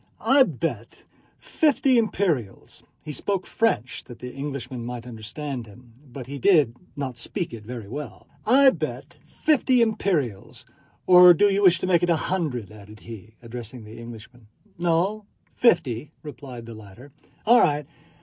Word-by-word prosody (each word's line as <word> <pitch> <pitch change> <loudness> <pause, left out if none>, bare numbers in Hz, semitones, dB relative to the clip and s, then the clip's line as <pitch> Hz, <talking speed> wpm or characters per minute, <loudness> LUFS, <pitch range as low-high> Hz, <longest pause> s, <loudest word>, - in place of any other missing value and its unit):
"I 270 +5 +4
bet 165 - -2 0.3
fifty 275 -4 +2
imperials"—he 160 - -3
spoke 190 +5 -2
French 130 - -1
that 120 -2 -11
the 125 0 -8
Englishman 135 -3 -6
might 120 0 -6
understand 120 +2 -6
him, 120 +3 -17 0.2
but 130 0 -8
he 140 +2 -7
did 150 - +4 0.2
not 130 -4 -5
speak 170 - -4
it 110 -2 -8
very 115 -2 -8
well—"I 150 - +1
bet - - -6
fifty 265 -4 +2
imperials... 175 - -1 0.4
or 180 -1 +8
do 205 - +4
you 200 - +1
wish 185 -3 +6
to - - -1
make 175 -2 +3
it 175 - +1
a 170 - +4
hundred?" 145 - -3
added 105 0 -14
he, 110 -1 -11
addressing 120 0 -8
the 110 +2 -11
Englishman. 115 0 -12 0.3
"No, 175 +5 0 0.3
fifty," 145 - +2
replied 135 -5 -9
the 115 - -9
latter. 110 +6 -13 0.3
"All 240 +2 +6
right. 150 0 +1
140 Hz, 145 wpm, -24 LUFS, 115-185 Hz, 0.4 s, or